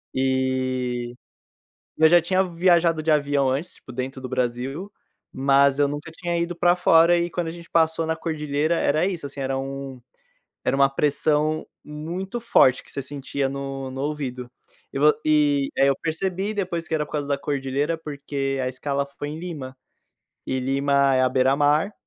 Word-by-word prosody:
E 130 -2 -1 0.9
e - - -3
eu 160 - +9
já 175 +1 +6
tinha 185 +3 +1
viajado 170 -2 +2
de 155 - 0
avião 145 -2 +2
antes, 140 +7 -2
tipo 130 - -13
dentro 130 +2 -5
do 130 - -6
Brasil, 130 - -3 0.4
mas 140 +1 +3
eu 145 - +4
nunca 145 +3 -6
tinha 175 0 -3
ido 170 +1 -2
pra 175 +1 +3
fora, 170 -1 +5
e 170 - 0
quando 175 -2 -2
a - - -3
gente 170 0 -11
passou 160 0 +2
na 160 - 0
Cordilheira 155 0 -1
era 155 +4 +2
isso, 175 -7 -3
assim, 140 0 -8
era 135 0 -1
um 135 -1 -6 0.6
era - - +1
uma 140 0 +5
pressão 150 +2 0 0.2
muito 175 +9 -5
forte 135 - +4
que - - -16
você 140 - -4
sentia 140 0 -3
no 135 -1 -5
no 130 +1 -6
ouvido, 135 -4 -4 0.4
e - - -3
vo 150 +1 +6
e 145 -2 +3
aí 140 - +4
eu 135 - +2
percebi 190 +5 -2
depois 175 -5 -3
que 160 - -3
era 150 - +1
por - - -17
causa 145 -2 -2
da 140 - +1
Cordilheira, 140 +3 -2
porque 140 -3 -3
a 130 - 0
escala 140 +2 -2
foi 145 - -4
em 155 - -6
Lima 145 -7 -7 0.7
e 130 0 -1
Lima 140 +1 +2
é 130 - +3
à 130 - +4
beira-mar, 145 +8 +2
145 Hz, 180 wpm, -24 LUFS, 135-165 Hz, 0.9 s, eu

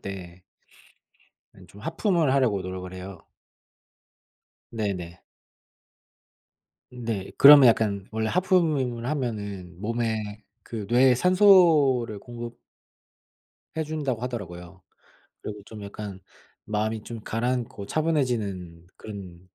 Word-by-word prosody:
때 90 -2 -8 1.1
아니 - - -17
좀 100 - -15
하품을 170 - +1
하려고 120 -8 +2
노력을 90 0 -6
해요. 95 +1 -9 1.5
네네. 95 -6 -4 1.7
네. 115 -6 -4
그러면 140 -2 +10
약간 105 -4 +2
원래 110 0 -1
하품을 155 -10 +1
하면은 100 - -4
몸에 110 -2 -3 0.2
그 110 -3 -6
뇌에 125 +1 +5
산소를 160 - +5
공급 120 +2 -8 1.2
해 160 - +1
준다고 145 -6 -3
하더라고요. 95 -7 -7 0.6
그리고 105 -1 -7
좀 110 -2 -10
약간 100 -1 -7 0.4
마음이 110 +1 -2
좀 115 0 -8
가라앉고 115 -3 -2
차분해지는 110 - -1
그런 95 -5 -9
110 Hz, 220 characters per minute, -26 LUFS, 100-130 Hz, 1.7 s, 그러면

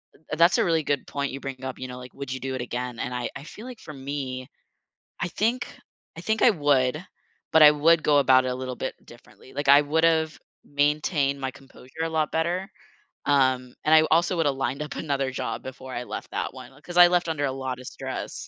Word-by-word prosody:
Th 150 0 -7
That's 170 +1 +6
a - - +3
really 165 -2 +2
good 145 -1 -1
point 140 -2 -3
you 135 - -6
bring 135 -1 -7
up, 130 -1 -5
you 130 - -5
know, 125 - -8
like, 125 0 -11
"Would 140 -2 -5
you 130 - -5
do 130 0 -4
it 130 - -3
again?" 125 0 -4
and 125 - -3
I 125 -1 -2
I 140 - -7
feel 215 +8 -11
like, 250 -3 -9
for 155 - -10
me, 135 -1 -5 0.7
I 175 - -1
think 230 +8 0 0.5
I - - -7
think 220 0 0
I - - +8
would, 145 - +2 0.6
but 160 -1 +7
I 150 - +11
would 155 +2 +4
go 145 -1 +3
about 130 -2 +5
it - - 0
a 125 - -2
little 130 -1 -5
bit 130 - -4
differently, 115 0 -17
like, 145 -1 -3
I 140 +1 +8
would've 160 +1 +2 0.3
maintained 145 0 +1
my 130 - -2
composure 135 +4 -9
a - - -1
lot 155 -1 0
better, 175 +4 -1 0.6
um, 130 -3 +2
and 155 - +4
I - - +9
w 155 - +1
also 170 +3 +3
would've 145 -4 +1
lined 135 +2 -2
up 150 - -7
another 140 -4 -1
job 115 -3 -4
before 130 0 -8
I 120 - -3
left - - -7
that - - -3
one, 130 0 -11
uh 140 - -19
'cause 175 +4 -7
I 175 0 +10
left 175 -1 +1
under 145 -3 -1
a 135 - -1
lot 130 -1 -4
of 130 - -10
stress, - - -6
140 Hz, 235 wpm, -25 LUFS, 130-160 Hz, 0.7 s, I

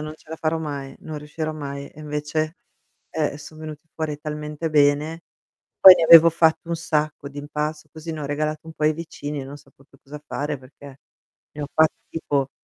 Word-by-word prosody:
"Non 155 0 -6
ce - - -25
la 160 - -6
farò 160 0 0
mai, 140 -4 -5
non 155 -1 -6
riuscirò 155 +1 -4
mai", 140 -2 -6
e 155 - -14
invece, 150 +2 -2 0.5
eh, 150 -2 -1
son 155 +1 -12
venuti 155 0 -9
fuori 155 -2 -3
talmente 150 +1 -4
bene, 150 +2 +2 0.6
poi 190 -1 +12
ne 165 - +1
avevo 165 0 +10
fatto 165 0 +2
un 170 - -1
sacco 155 -3 -1
di 145 - -10
impasto, 150 +1 -4
così 160 +1 -7
ne 155 - -6
ho 145 - -3
regalato 155 +2 -2
un 160 - -8
po' 150 - -2
ai 155 - +5
vicini 150 -3 -6
e - - -6
non 140 +2 -9
sapevo 135 -1 -21
più 135 - -22
cosa 150 +2 -10
fare, 145 0 -3
perché 135 +1 -14 0.5
ne 150 - -6
ho - - -3
fatti 160 0 +4
tipo 140 -4 -1
150 Hz, 205 wpm, -23 LUFS, 145-160 Hz, 0.6 s, poi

